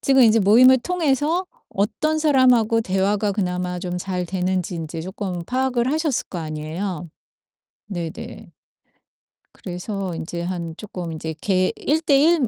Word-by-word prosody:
지금 270 -1 +4
인제 225 -1 +6
모임을 250 +6 +7
통해서 325 +3 0 0.2
어떤 310 +11 0
사람하고 250 -7 +4
대화가 200 +1 +1
그나마 180 -2 -2
좀 180 0 -4
잘 180 -1 -3
되는지 185 0 -1
인제 165 0 -5
쪼끔 185 0 -5
파악을 255 +2 0
하셨을 310 -4 0
거 180 - -5
아니에요. 160 +3 -4 0.8
네 175 -5 -3
네. - - -10 1.0
그래서 185 0 -5
인제 170 +1 -5
한 170 -2 -4
쪼끔 180 -5 -6
인제 160 0 -4
개 185 -2 +2
1:1 300 -1 +3
195 Hz, 265 characters per minute, -22 LUFS, 180-260 Hz, 1.0 s, 모임을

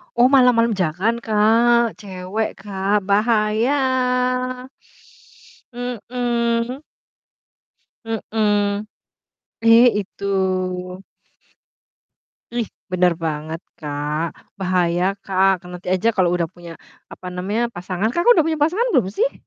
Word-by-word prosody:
Oh, 245 +2 +4
malam-malam 250 -4 +5
jangan 185 +8 0
Kak, 230 +1 +3
cewek 195 +2 -4
Kak 200 +1 -1
bahaya. 250 +4 +1 1.0
Mhm. 240 +1 -2 1.2
Mhm. 210 -2 0 0.8
Eh 230 +2 +7
itu. 200 0 -10 2.3
Ih, 235 -2 0 0.3
bener 180 -1 +3
banget 155 +1 -3 0.2
Kak, 150 +1 -3 0.4
bahaya 180 -2 +1 0.2
Kak, 190 0 +3
ke - - -29
nanti 180 0 -8
aja 190 +5 +1
kalau 185 -2 +3
udah 170 - 0
punya 175 -1 -11 0.4
apa 185 - -11
namanya, 200 +6 -1
pasangan. 185 +3 -2
Kakak 345 - +3
udah 325 - +4
punya 315 -2 -1
pasangan 405 +11 0
belum 255 - +3
sih? - - +1
220 Hz, 100 wpm, -20 LUFS, 185-245 Hz, 2.3 s, Eh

